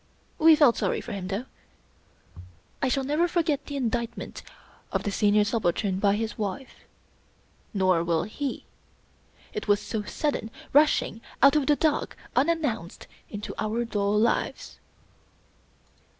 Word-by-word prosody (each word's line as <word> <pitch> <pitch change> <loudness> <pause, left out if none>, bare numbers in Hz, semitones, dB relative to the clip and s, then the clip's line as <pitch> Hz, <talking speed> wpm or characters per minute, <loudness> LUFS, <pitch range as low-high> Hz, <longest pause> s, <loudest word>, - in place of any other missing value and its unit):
We 320 0 +8
felt 290 -6 +5
sorry - - 0
for - - -8
him, 195 -3 -4
though. 200 +6 -3 1.4
I - - +2
shall 265 +1 0
never 300 +6 +1
forget 320 -5 0
the 285 - -5
indictment 235 -3 -3 0.5
of - - -1
the 205 - -2
Senior 210 +1 +3
Subal 205 -5 0
tern 190 -3 -1
by 200 0 +3
his 220 +1 -3
wife. 215 +6 -5 0.9
Nor 185 -5 +2
will 170 -1 +1
he. 270 +7 -4 0.9
It 425 - -5
was 205 0 +4
so 220 0 -3
sudden, 250 +1 -2 0.2
rushing 290 -6 +3 0.2
out 275 +2 +7
of 295 -3 +2
the 295 - +5
dark, 305 0 0 0.2
unannounced, 270 - 0 0.2
into 205 0 -6
our 225 +2 -1
dull 205 -2 0
lives. 230 +3 0
230 Hz, 135 wpm, -26 LUFS, 205-285 Hz, 1.4 s, We